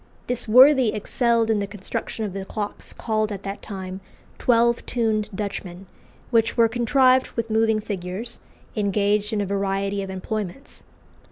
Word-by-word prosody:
This 245 -1 -2
worthy 255 +1 +6
excelled 230 +1 +1
in 215 - +2
the 200 - -2
construction 205 +2 -4
of 195 - -5
the 195 0 -4
clocks 205 +1 -5
called 215 -1 -1
at 200 -1 -6
that 195 +1 -5
time 190 -2 -7 0.4
"Twelve 235 -1 +3
tuned 220 -3 0
Dutchmen," 195 -2 -5 0.5
which 225 -1 +2
were 230 -1 +6
contrived 255 +3 +3
with 230 -1 -2
moving 220 0 +3
figures, 205 +3 -5 0.4
engaged 205 0 +1
in 215 -2 0
a - - -1
variety 195 0 -1
of 195 - -5
employments. 200 +5 -5
215 Hz, 150 wpm, -23 LUFS, 200-230 Hz, 0.5 s, worthy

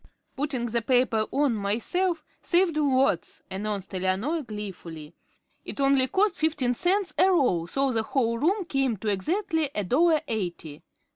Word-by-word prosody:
"Putting 270 -4 -1
the 235 0 0
paper 230 -2 +2
on 280 -3 +2
myself 300 - -1 0.2
saved 350 -2 +2
lots," 270 - +1
announced 200 0 -4
Eleanor, 190 - -1
gleefully. 180 - -8 0.5
"It - - -7
only 275 -1 +3
cost 385 +4 +1
fifteen 295 -6 +1
cents 365 - 0
a 380 - +6
roll, 250 - +2
so 275 +7 0
the 225 -2 +1
whole 230 0 0
room 370 - +1
came 270 -7 0
to 215 +3 -3
exactly 320 - 0
a 205 - 0
dollar 310 - +3
eighty. 175 - -4
255 Hz, 145 wpm, -26 LUFS, 210-315 Hz, 0.5 s, a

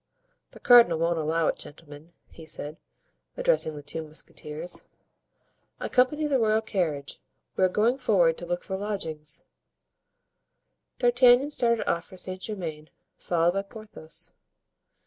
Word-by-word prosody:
"The - - -15
cardinal 235 -9 +7
won't 165 +1 0
allow 160 +1 +1
it. - - 0
Gentlemen," 150 +2 -13 0.2
he 165 - -12
said, 155 0 -5 0.6
addressing - - +2
the 145 - -9
two 145 +3 -4
musketeers, 155 +1 -7 0.9
"accompany 280 +4 +1
the 280 -3 +2
royal 220 -1 +2
carriage, 160 -10 -2 0.4
we - - +1
are 185 - +5
going 230 +7 +1
forward 175 -9 +3
to 175 - -8
look 175 0 -2
for 190 - -4
lodgings." 165 -7 -5 1.5
D'Artagnan 245 +3 +5
started 235 -5 +1
off 170 0 0
for 185 - -13
Saint 185 +1 -3
Germain, 165 -8 -5 0.3
followed 170 0 +1
by 195 +2 -1
Porthos. 200 -6 -8
180 Hz, 130 wpm, -27 LUFS, 160-225 Hz, 1.5 s, cardinal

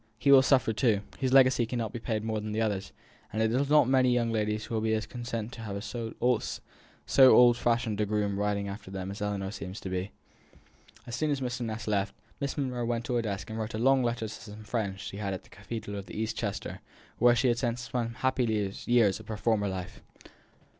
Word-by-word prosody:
he 140 - +3
will 135 -1 +9
suffer 130 -4 +3
too; 110 -3 +2 0.2
his 130 -1 0
legacy 130 -2 +6
can 120 +2 -3
no 115 - 0
more 110 - -4
be 120 - -5
paid 110 -1 -2
than 110 -1 -2
the 110 - -1
others; 100 -3 -1 0.4
and 110 - -3
it 110 0 +2
is 135 +3 +1
not 150 -4 +6
many 130 -1 +4
young 120 -2 +1
ladies 105 -1 -1
who - - -7
will 110 - 0
be 110 0 +1
as 110 -1 -2
content 115 -1 -5
to 115 - -9
have 100 -2 -5
so 115 -1 -5 0.9
old 125 -3 +7
fashioned 115 -3 0
a - - +2
groom 100 -1 0
riding 100 -1 0
after 100 0 -7
them 95 0 -5
as 100 - -8
Ellinor 100 -2 -2
seems 95 -1 -7
to 95 - -5
be." 95 +1 -2 1.0
As 120 - -5
soon 155 +4 0
as 145 -2 0
Mr. 125 -1 -3
Ness 110 -2 -4
had 105 - -1
left, 100 0 0 0.2
Miss 140 +1 -3
Monro 125 -4 -2
went 120 0 -1
to 125 - -2
her 120 - +2
desk 105 -1 -4
and 110 - -4
wrote 110 0 -3
a - - -2
long 135 +3 +4
letter 120 -2 -1
to 110 - -7
some 110 0 -10
friends 100 -3 -3
she 100 0 -6
had 100 -2 -2
at 90 - -9
the - - -20
cathedral 105 +3 -7
town - - -3
of 100 - -10
East 110 0 -3
Chester, - - -4 0.4
where 120 0 +6
she 125 +1 +3
had 120 0 +1
spent 120 -2 0
some 120 -1 -3
happy 130 0 +1 0.4
years 115 -5 +4
of 110 - -13
her 110 - -4
former 105 -2 +1
life. 90 -2 -5
110 Hz, 235 wpm, -29 LUFS, 105-120 Hz, 1.0 s, will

